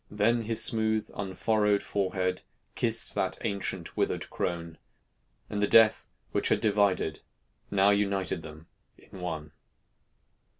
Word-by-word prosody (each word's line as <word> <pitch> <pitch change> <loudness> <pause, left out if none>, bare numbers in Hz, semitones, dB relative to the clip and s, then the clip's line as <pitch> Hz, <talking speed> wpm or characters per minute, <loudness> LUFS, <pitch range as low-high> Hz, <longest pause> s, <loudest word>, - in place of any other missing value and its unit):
Then 110 +3 +1
his 110 0 +4
smooth, 110 -1 +1
unfurrowed 105 +1 0
forehead 95 -2 -1 0.3
Kissed - - +3
that - - -2
ancient 95 -3 -4
withered - - -2
crone; 85 -2 -4 0.7
And 105 - -3
the 105 - +2
Death 110 0 +5 0.2
which - - 0
had - - +2
divided 100 -7 +1 0.5
Now 100 0 +4
united 100 -3 0
them 80 0 -11 0.3
in 95 - -14
one. 80 -4 -5
100 Hz, 120 wpm, -28 LUFS, 90-105 Hz, 0.7 s, Death